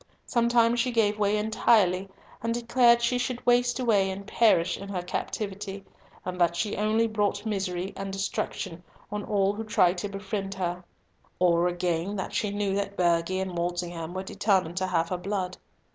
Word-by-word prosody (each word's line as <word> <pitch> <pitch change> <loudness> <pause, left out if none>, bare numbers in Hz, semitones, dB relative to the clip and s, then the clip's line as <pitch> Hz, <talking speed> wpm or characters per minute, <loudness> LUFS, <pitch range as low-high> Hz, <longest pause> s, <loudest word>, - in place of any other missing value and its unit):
Sometimes 235 -1 +3
she 250 +2 +2
gave 215 -3 +2
way 205 0 +2
entirely, 210 -3 +2 0.3
and 230 +1 -1
declared 235 0 +4
she 245 +1 +2
should 245 0 -3
waste 245 +1 +3
away 210 -6 +3
and 195 +1 -6
perish 195 -5 +3
in 195 0 -8
her 180 -3 -3
captivity, 195 +1 -4 0.4
and 180 0 -4
that 170 0 +3
she 205 +3 -1
only 215 +2 +2
brought 210 -1 -1
misery 190 -3 -2
and 195 0 -5
destruction 195 -3 -3 0.3
on 210 0 -3
all 200 -1 +1
who 220 +2 -5
tried 180 -4 +2
to 205 - -3
befriend 195 0 -4
her; 180 -1 -3 0.5
or, 175 -1 +3
again, 175 +2 -1
that 190 - -4
she 210 - 0
knew 205 -1 -1
that 200 0 -2
Burghley 175 +1 +2
and 190 -2 -3
Walsingham 175 -1 -3
were 190 - -3
determined 190 -4 0
to 185 0 0
have 165 -2 0
her 180 - -1
blood. 185 0 -3
195 Hz, 175 wpm, -27 LUFS, 180-215 Hz, 0.5 s, declared